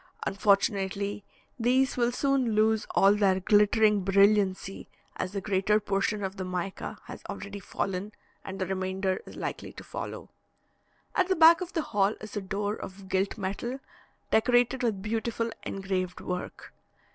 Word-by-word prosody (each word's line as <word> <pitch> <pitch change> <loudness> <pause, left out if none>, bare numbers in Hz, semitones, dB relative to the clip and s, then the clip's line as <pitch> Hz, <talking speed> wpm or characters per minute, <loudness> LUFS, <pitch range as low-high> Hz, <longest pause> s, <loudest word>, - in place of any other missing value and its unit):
Unfortunately, 200 0 +1 0.4
these 255 +3 +2
will 240 -1 +2
soon 265 -3 +1
lose 220 0 +2
all 195 +1 +6
their 195 -2 +3
glittering 210 +1 +4
brilliancy, 195 0 +2 0.3
as 185 - -3
the 200 -1 -3
greater 205 +1 +2
portion 200 0 -1
of 190 +1 -4
the 190 - -3
mica 185 +1 -4
has - - -9
already 200 0 -6
fallen, 195 +1 -3 0.3
and 190 0 -6
the 190 - -1
remainder 190 0 -2
is - - -10
likely - - -5
to - - -10
follow. - - -7 0.8
At 370 -2 +2
the 375 - +2
back 330 +1 +7
of 365 0 -5
the 325 - 0
hall 205 -3 +1
is 215 -1 -9
a 205 - -1
door 205 +2 -2
of 190 -2 -9
gilt 190 +3 0
metal, 205 +6 -3 0.5
decorated 245 +3 +3
with 215 -6 -1
beautiful 230 +1 -2
engraved 190 -2 -3
work. 180 0 -6
205 Hz, 150 wpm, -28 LUFS, 190-225 Hz, 0.8 s, back